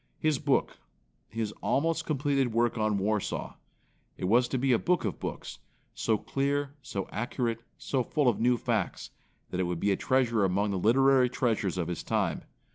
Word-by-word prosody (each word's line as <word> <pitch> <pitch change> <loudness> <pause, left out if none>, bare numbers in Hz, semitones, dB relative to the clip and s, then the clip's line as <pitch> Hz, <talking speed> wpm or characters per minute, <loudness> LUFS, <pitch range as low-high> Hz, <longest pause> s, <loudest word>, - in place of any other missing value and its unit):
His 155 -4 +1
book, 140 -3 0 0.5
his 110 0 -3
almost 165 +3 0
completed 140 -4 +1
work 120 +1 +2
on 110 -2 +1
Warsaw. 105 +1 -1 0.6
It - - -8
was 120 +6 +4
to 130 - -2
be 130 +1 +1
a 120 - +4
book 180 -8 +1
of 100 - -3
books, - - -6 0.3
so 110 -2 +1
clear, 140 +3 -1
so 100 -7 -4
accurate, 120 0 -2 0.2
so 135 - -1
full 145 +2 0
of 120 - +2
new 125 +2 +4
f 120 - -11
acts 110 -6 -1 0.4
that 90 - -2
it 90 - +1
would 85 -1 -2
be 100 - +1
a - - +3
treasure 120 -4 +1
among 100 +2 +1
the 95 - -1
literary 130 +4 +4
treasures 110 -7 0
of 85 -2 -1
his 90 -2 -3
time. - - -1
120 Hz, 185 wpm, -29 LUFS, 105-135 Hz, 0.6 s, was